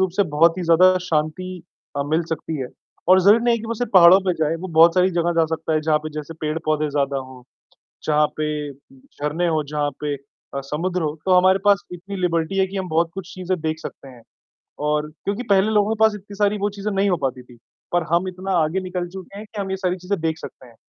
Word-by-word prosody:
रूप 190 -1 +2
से 200 - +5
बहुत 165 +3 +4
ही - - -2
ज़्यादा 185 +3 +5
शांति 165 +4 -2 0.3
अ, 140 - +1
मिल 160 +3 +1
सकती 160 0 -3
है 130 - -4 0.4
और 185 +1 +7
ज़रूरी 210 +5 +5
नहीं 235 -1 +3
कि 225 - -8
वो 230 - -2
सिर्फ़ 245 +2 -3
पहाड़ों 185 +1 +8
पे 190 -1 0
जाए, 155 +1 +1
वो 185 +3 -7
बहुत 165 0 +6
सारी 185 +1 +3
जगह 175 -1 0
जा - - +4
सकता 160 - -4
है 155 - +2
जहाँ 155 0 +2
पे - - -5
जैसे 150 +2 -7
पेड़-पौधे 155 -1 -1
ज़्यादा 140 -1 0
हों, 130 -1 -10 0.6
जहाँ 150 0 +3
पे 155 - -1 0.3
झरने 175 - -5
हों, 160 -2 +1
जहाँ 145 0 -2
पे 150 -1 -2
अ, 140 0 -10
समुद्र 175 +4 -1
हो 150 -1 -1
तो 185 - +4
हमारे 185 +1 +4
पास 200 -3 +4
इतनी 185 +3 -7
लिबर्टी 170 +1 0
है 190 - +3
कि 195 +1 -8
हम 190 -1 -3
बहुत 165 +1 +1
कुछ 195 -1 -8
चीज़ें 185 -1 -3
देख 160 0 -2
सकते 135 - -9
हैं 125 -3 -14 0.7
और 150 0 0 0.2
क्योंकि 205 +5 -2
पहले 195 +1 +4
लोगों 210 0 +2
के - - -6
पास 220 -1 +5
इतनी 205 0 -11
सारी 205 +1 +1
वो 205 +1 0
चीज़ें 205 +1 -3
नहीं 195 +1 +2
हो 180 - +3
पाती 130 -1 -2
थी 125 0 -17 0.4
पर 175 -1 +2
हम 175 +2 +2
इतना 185 +1 -5
आगे 160 +5 -1
निकल 180 -1 -4
चुके 190 +2 -10
हैं 210 - -8
कि 210 0 -9
हम 195 -1 -4
ये 190 - -1
सारी 185 -1 -1
चीज़ें 185 +2 -3
देख 160 0 -1
सकते 130 - -11
हैं, 120 - -19
175 Hz, 240 wpm, -22 LUFS, 155-190 Hz, 0.7 s, पहाड़ों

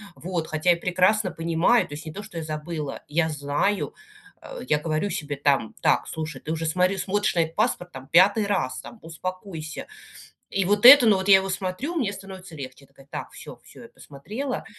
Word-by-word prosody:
вот. 170 -2 -4
Хотя 155 +3 +1
я 170 - +2
прекрасно 185 +3 +2
понимаю, 165 +8 +2
то 145 - -10
есть, 150 - -9
не 155 - -7
то, 205 +4 -7
что 170 - -10
я 160 - -3
забыла, 155 -1 -5
я 160 +2 +1
знаю, 145 +7 -1 0.5
э, - - -9
я 150 - +3
говорю 155 +5 -1
себе 145 -6 -4
там: 140 -5 0
так, - - +2
слушай, 160 -3 -5
ты 155 - -5
уже 165 0 -2
смотри 185 +4 +1
смотришь 205 0 0
на - - +2
этот 160 0 -3
паспорт, 210 -5 -1
там, 130 -2 -10
5 200 +7 +5
раз, 185 -11 -1
там, 235 - -12
успокойся. 165 -1 -7 0.6
И 195 - 0
вот 205 +3 +1
это, 260 -1 +11
ну, 215 - +6
вот 190 +1 -3
я 195 - +9
его 190 0 -1
смотрю, 190 - -3
мне 240 -12 -1
становится 190 -4 -10
легче, 130 -2 -8
я 140 - -18
такая: 135 - -20
так, - - -6
всё - - -11
всё, - - -15
я - - -12
посмотрела. 220 - -6
175 Hz, 205 wpm, -24 LUFS, 155-200 Hz, 0.6 s, это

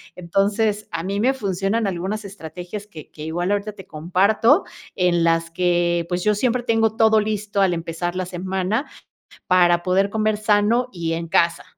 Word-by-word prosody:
Entonces, 200 +4 0
a 165 - -3
mí 195 +3 -3
me 255 +5 +3
funcionan 200 -1 -1
algunas 195 +4 -3
estrategias 180 +1 -8
que 165 -8 -12
que 150 - -10
igual 175 +4 -2
ahorita 205 +1 -1
te 195 -2 -13
comparto, 195 - +2 0.3
en 175 -2 +2
las 165 0 +1
que, 175 0 +1
pues, 180 0 -2
yo 210 0 +2
siempre 245 +3 0
tengo 225 -2 +1
todo 220 -1 +4
listo 210 -1 -2
al 190 -2 +3
empezar 170 +1 -4
la 185 0 -2
semana 190 - -2 0.6
para 175 -1 +4
poder 190 +2 +2
comer 215 0 0
sano 215 +3 +2
y 165 -3 -3
en 165 0 -4
casa. 170 +1 +2
190 Hz, 170 wpm, -21 LUFS, 175-210 Hz, 0.6 s, todo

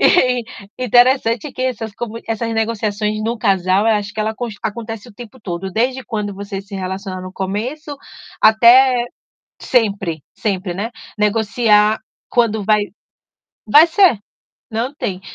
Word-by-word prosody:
E, 250 -8 +4 0.3
interessante 250 +1 +3
que 255 - -5
essas 225 -4 -3
comu 230 0 -5
essas 225 0 -2
negociações 215 -1 -1
no 230 +2 -1
casal, 195 -1 +2
eu 225 - +4
acho 205 0 -3
que 215 - -3
ela 220 +1 -1
cons 235 -3 -5
acontece 225 +1 -5
o 235 - -14
tempo 240 +1 -12
todo, 190 0 -5
desde 255 +4 0
quando 210 -4 -4
você 200 0 -6
se 200 0 -11
relaciona 190 0 -5
no 185 0 -8
começo 250 +11 -4 0.4
até 240 +3 +6 0.6
sempre, 195 - 0
sempre, 190 -3 -2
né, 215 +5 -3 0.3
negociar 210 0 +3 0.3
quando 220 -3 +1
vai 210 0 +3 0.8
vai 295 +10 +7
ser, 340 - +4 0.5
não 235 +6 -2
tem. 190 -10 -4
220 Hz, 140 wpm, -18 LUFS, 205-245 Hz, 0.8 s, vai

